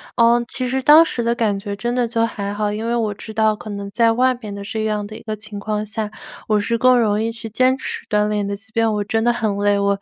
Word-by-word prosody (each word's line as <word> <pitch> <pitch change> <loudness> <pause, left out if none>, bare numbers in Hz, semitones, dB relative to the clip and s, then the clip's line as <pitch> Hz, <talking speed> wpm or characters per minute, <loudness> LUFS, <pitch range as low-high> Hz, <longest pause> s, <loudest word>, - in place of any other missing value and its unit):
呃， 235 0 +4
其 255 - -3
实 265 +1 0
当 300 +4 +8
时 285 -7 -3
的 235 0 0
感 215 -5 0
觉 200 0 -5
真 240 +4 -2
的 245 -1 +1
就 230 0 +1
还 200 -3 -4
好， 205 0 -1
因 215 +2 -4
为 235 - 0
我 220 -3 0
知 220 +2 -10
道 220 0 +3
可 215 - -9
能 200 0 -5
在 230 +2 +3
外 255 +2 +3
边 215 -5 -8
的 200 - -7
这 215 +2 -3
样 210 -1 -1
的 215 +1 -9
一 - - -14
个 215 -1 -4
情 210 -1 -9
况 210 +1 -2
下， 215 0 -4 0.4
我 215 - +3
是 230 +3 0
更 255 +1 +5
容 215 -3 +2
易 225 - 0
去 225 -1 -8
坚 255 +4 +2
持 - - -6
锻 210 0 +2
炼 210 -1 -1
的。 200 - -2
即 220 +2 -17
便 225 0 +1
我 210 - -1
真 225 +2 -1
得 240 - +4
很 215 -4 -1
累， 205 0 +2
我， 200 0 +1
220 Hz, 305 characters per minute, -20 LUFS, 205-235 Hz, 0.4 s, 当